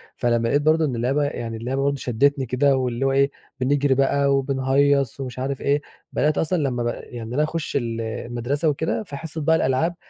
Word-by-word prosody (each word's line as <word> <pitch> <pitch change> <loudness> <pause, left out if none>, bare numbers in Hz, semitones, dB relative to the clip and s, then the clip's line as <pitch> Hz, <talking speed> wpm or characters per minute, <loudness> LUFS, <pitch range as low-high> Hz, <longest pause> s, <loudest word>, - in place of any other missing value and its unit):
فلمّا 120 -1 +1
لاقيت 145 +5 +2
برضه 155 +1 +3
إن 130 -4 -2
اللعبة، 135 +5 +1
يعني 115 -5 -3
اللعبة 130 +4 -2
برضه 140 0 +1
شدّتني 135 +2 +1
كده، 135 +3 +2
واللي 125 0 -1
هو 135 - +2
إيه، 140 +1 +3 0.3
بنجري 140 +1 +2
بقى، 140 +1 +2
وبنهيّص 135 0 +1
ومش 130 -1 -5
عارف 135 +1 -3
إيه، 145 +1 +1 0.3
بدأت 150 0 +1
أصلًا 170 +3 +1
لما 130 -5 -1
ب - - 0
يعني 120 0 -6
إن - - -6
أنا 150 +3 +2
أخش 160 0 -3
ال 115 -4 -1
المدرسة 120 +7 -2
وكده 160 +8 -1
في 145 -8 -8
حصة 160 +1 -5
بقى 160 +2 +3
الألعاب 160 +6 +1
135 Hz, 200 wpm, -23 LUFS, 125-145 Hz, 0.3 s, برضه